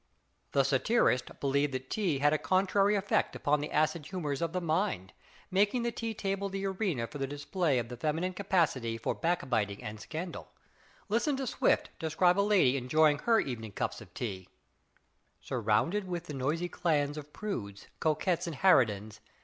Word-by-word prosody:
The 140 Hz, -, +4 dB
satirists 135 Hz, -, +2 dB
believed 140 Hz, 0 st, +1 dB
that 130 Hz, 0 st, -6 dB
tea 185 Hz, -9 st, 0 dB
had 145 Hz, +2 st, +3 dB
a 155 Hz, -, +1 dB
contrary 195 Hz, +2 st, +2 dB
effect 200 Hz, 0 st, 0 dB
upon 150 Hz, -1 st, +1 dB
the 150 Hz, -, -4 dB
acid 155 Hz, 0 st, +1 dB
humors 155 Hz, -6 st, -3 dB
of 165 Hz, -1 st, 0 dB
the 180 Hz, -, -1 dB
mind, 165 Hz, -, -1 dB, 0.4 s
making 205 Hz, +6 st, +2 dB
the 235 Hz, -, 0 dB
tea 230 Hz, -1 st, -4 dB
table 195 Hz, 0 st, -2 dB
the 195 Hz, 0 st, -3 dB
arena 190 Hz, -, -1 dB
for 145 Hz, +5 st, -9 dB
the 135 Hz, -, -1 dB
display 145 Hz, +1 st, 0 dB
of 120 Hz, -1 st, -1 dB
the 125 Hz, -, -6 dB
feminine 160 Hz, +8 st, -1 dB
capacity 165 Hz, -, 0 dB
for 115 Hz, -, -1 dB
backbiting 120 Hz, -, -1 dB
and 105 Hz, 0 st, -6 dB
scandal. 165 Hz, -, -6 dB, 0.6 s
Listen 240 Hz, +7 st, +1 dB
to 270 Hz, -, -2 dB
Swift -, -, +1 dB
describe 175 Hz, +4 st, +2 dB
a -, -, +6 dB
lady 190 Hz, -11 st, +4 dB
enjoying 150 Hz, +3 st, +3 dB
her 225 Hz, +6 st, +3 dB
evening 115 Hz, -5 st, -4 dB
cups -, -, -3 dB
of -, -, -13 dB
tea: 95 Hz, -6 st, -5 dB, 0.9 s
"Surrounded 130 Hz, -, 0 dB
with 175 Hz, -1 st, -4 dB
the 150 Hz, -, -7 dB
noisy 150 Hz, +6 st, -1 dB
clans 150 Hz, -5 st, 0 dB
Of 150 Hz, -1 st, -8 dB
prudes, 110 Hz, -, -5 dB
coquettes 165 Hz, +3 st, 0 dB
and 165 Hz, -, -4 dB
harridans. 110 Hz, -, +3 dB
155 Hz, 170 wpm, -31 LUFS, 130-190 Hz, 0.9 s, a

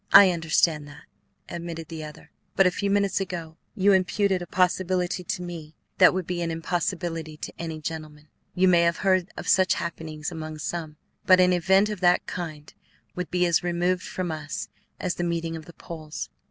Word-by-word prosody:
"I 195 Hz, -1 st, +9 dB
understand 160 Hz, -2 st, +1 dB
that," 145 Hz, -, -13 dB, 0.4 s
admitted 170 Hz, -2 st, -6 dB
the 160 Hz, -2 st, -6 dB
other; 150 Hz, 0 st, -11 dB, 0.2 s
"but 195 Hz, -, +5 dB
a 180 Hz, -, +5 dB
few 200 Hz, +3 st, -2 dB
minutes 200 Hz, -1 st, +2 dB
ago 170 Hz, -4 st, -5 dB, 0.2 s
you 200 Hz, -1 st, +4 dB
imputed 190 Hz, 0 st, +2 dB
a 175 Hz, -, -6 dB
possibility 180 Hz, 0 st, +1 dB
to 180 Hz, +1 st, -3 dB
me 165 Hz, -3 st, -8 dB, 0.2 s
that 185 Hz, -, +8 dB
would 185 Hz, -1 st, -2 dB
be 175 Hz, 0 st, -3 dB
an 170 Hz, -, -1 dB
impossibility 165 Hz, -1 st, -2 dB
to -, -, -7 dB
any 160 Hz, -2 st, -4 dB
gentleman. 155 Hz, -1 st, -7 dB, 0.3 s
You 185 Hz, +1 st, +4 dB
may 175 Hz, -2 st, +5 dB
have 170 Hz, 0 st, +2 dB
heard 185 Hz, -1 st, +3 dB
of -, -, -6 dB
such 185 Hz, -1 st, +4 dB
happenings 160 Hz, -2 st, -5 dB
among 155 Hz, -2 st, -6 dB
some, 155 Hz, -1 st, -4 dB, 0.3 s
but 185 Hz, -1 st, +7 dB
an 180 Hz, 0 st, +5 dB
event 190 Hz, +4 st, +4 dB
of 210 Hz, -3 st, -4 dB
that 175 Hz, -1 st, +3 dB
kind 155 Hz, -4 st, -6 dB, 0.4 s
would 180 Hz, -1 st, -4 dB
be 180 Hz, 0 st, +2 dB
as 170 Hz, -2 st, +3 dB
removed 175 Hz, +1 st, +1 dB
from 185 Hz, -2 st, -4 dB
us 155 Hz, -1 st, -5 dB, 0.3 s
as 175 Hz, -, -1 dB
the 175 Hz, -, -3 dB
meeting 165 Hz, -1 st, -2 dB
of 160 Hz, -1 st, -8 dB
the 170 Hz, -, -13 dB
poles. 155 Hz, -3 st, -7 dB
175 Hz, 190 wpm, -26 LUFS, 160-185 Hz, 0.4 s, I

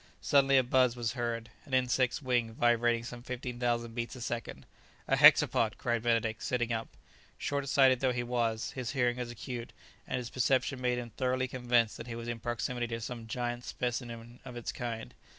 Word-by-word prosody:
Suddenly 140 Hz, -1 st, +4 dB
a 130 Hz, -, +5 dB
buzz 125 Hz, -1 st, +3 dB
was 115 Hz, -3 st, -2 dB
heard, 115 Hz, -2 st, -3 dB
an 130 Hz, -, -2 dB
insect's 130 Hz, +2 st, +1 dB
wing 120 Hz, -3 st, +1 dB
vibrating 120 Hz, 0 st, +3 dB
some 120 Hz, 0 st, -7 dB
fifteen 125 Hz, 0 st, -5 dB
thousand 120 Hz, -1 st, 0 dB
beats 120 Hz, +1 st, -4 dB
a -, -, -9 dB
second! 120 Hz, 0 st, -4 dB, 0.4 s
"A -, -, +3 dB
hexapod!" -, -, +6 dB
cried 120 Hz, -1 st, 0 dB
Benedict, 115 Hz, -1 st, +1 dB
sitting 120 Hz, -3 st, 0 dB
up. 115 Hz, 0 st, -2 dB, 0.5 s
Short 140 Hz, -1 st, -2 dB
sighted 130 Hz, -2 st, +5 dB
though 130 Hz, -1 st, +2 dB
he 120 Hz, 0 st, -1 dB
was, 115 Hz, -2 st, -1 dB
his 125 Hz, -2 st, -4 dB
hearing 125 Hz, -3 st, +1 dB
was 125 Hz, -1 st, -4 dB
acute, 120 Hz, 0 st, -6 dB, 0.3 s
and -, -, -1 dB
his 120 Hz, -1 st, -5 dB
perception 130 Hz, +1 st, +1 dB
made 125 Hz, -1 st, +1 dB
him 120 Hz, -1 st, -5 dB
thoroughly 130 Hz, +2 st, 0 dB
convinced 120 Hz, -3 st, +1 dB
that 115 Hz, -, -8 dB
he 115 Hz, -, -5 dB
was 115 Hz, 0 st, -6 dB
in 120 Hz, -1 st, -3 dB
proximity 120 Hz, +1 st, -2 dB
to 115 Hz, 0 st, -4 dB
some 115 Hz, 0 st, -6 dB
giant 120 Hz, +1 st, -3 dB
specimen 120 Hz, -1 st, -4 dB
of 125 Hz, -2 st, -9 dB
its 120 Hz, -, -4 dB
kind. 115 Hz, -2 st, -5 dB
120 Hz, 190 wpm, -31 LUFS, 115-125 Hz, 0.5 s, hexapod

